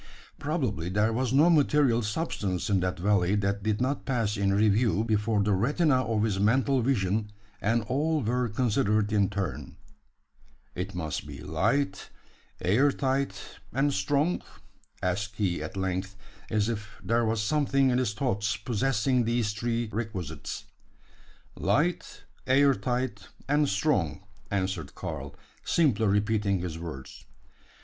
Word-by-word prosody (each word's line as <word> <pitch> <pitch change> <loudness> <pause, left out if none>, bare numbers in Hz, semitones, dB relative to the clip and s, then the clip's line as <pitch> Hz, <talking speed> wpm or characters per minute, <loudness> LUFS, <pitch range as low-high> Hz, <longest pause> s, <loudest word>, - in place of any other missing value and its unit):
Probably, 130 - -2
there 105 +4 +1
was 125 +1 0
no 145 +5 +5
material 145 -6 +3
substance 105 - -2
in 100 - +3
that 90 0 -1
valley 95 0 +2
that 100 0 0
did 105 0 0
not 130 +3 -1
pass 115 -6 0
in 100 -1 +1
review 105 0 +3
before 105 -1 +1
the 105 0 +2
retina 140 - +2
of 110 -2 0
his 105 -3 0
mental 130 +6 +3
vision; 105 -4 0 0.3
and 115 +2 +1
all 150 +5 0
were 120 +2 0
considered 105 -2 +1
in 100 -2 +3
turn. 100 -2 -4 1.0
"It 90 +1 -5
must 80 -4 -3
be 70 -2 -8
light, 95 - 0 0.5
air 125 +10 +3
tight, 135 0 -2
and 140 +3 +1
strong?" 145 - +1 0.6
asked 105 +4 -1
he, 95 -5 -1
at - - -6
length, 95 +1 -2 0.3
as 105 -1 +1
if 110 -1 -5
there 115 +1 +2
was 110 0 0
something 135 +1 +2
in 125 - +2
his 115 -5 -1
thoughts 105 -4 -1
possessing 125 +2 +1
these 115 -2 0
three 115 +1 -1
requisites. 95 -8 -5 0.9
"Light, 150 - 0 0.2
air 135 +2 +5
tight, 125 -6 -3 0.2
and 145 0 +2
strong," 95 - 0 0.3
answered 95 -6 -2
Karl, - - -6 0.3
simply 125 -10 +2
repeating 105 0 +1
his 85 -2 -5
words. 80 -6 -8
110 Hz, 135 wpm, -28 LUFS, 100-130 Hz, 1.0 s, no